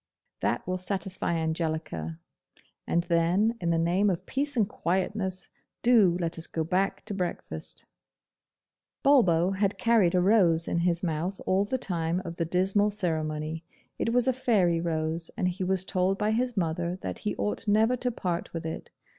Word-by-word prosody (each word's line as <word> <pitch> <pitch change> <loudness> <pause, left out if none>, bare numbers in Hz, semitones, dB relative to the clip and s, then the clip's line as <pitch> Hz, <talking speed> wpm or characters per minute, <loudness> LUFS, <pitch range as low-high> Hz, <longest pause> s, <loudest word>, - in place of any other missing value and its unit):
That - - -1
will 185 0 -2
satisfy 185 -2 -1
Angelica, 160 - -2 0.7
and 170 - +1
then, 175 +6 +2
in 170 - 0
the 165 - +2
name 175 +5 +2
of 180 -3 -2
peace 285 0 -2
and 215 -4 +3
quietness, 190 +1 -2 0.4
do 215 -8 +5
let 170 -1 -2
us 165 - -3
go 160 - -2
back 185 +4 -1
to 210 - -5
breakfast.' 175 - -4 1.2
Bulbo 190 - +4
had 195 +1 0
carried 220 -7 +3
a - - +4
rose 180 -4 +4
in 170 - 0
his 170 0 +1
mouth 175 +3 -2
all 190 +2 +2
the 260 +6 -1
time 170 -6 -1
of 170 0 -6
the 165 - 0
dismal 190 +4 +2
ceremony. 160 -5 -2 0.4
It 230 - 0
was 245 +1 +2
a 260 - +4
fairy 195 -10 +2
rose, 165 0 -2
and 180 - +1
he 180 +1 -2
was 185 0 +2
told 185 +1 +1
by 210 +1 +1
his 245 0 -1
mother 170 0 -1
that 90 - -4
he 105 - -2
ought 100 - -2
never 220 +4 +4
to 250 +1 0
part 180 -7 -3
with 165 -1 -5
it. 160 - -5
180 Hz, 170 wpm, -28 LUFS, 165-205 Hz, 1.2 s, do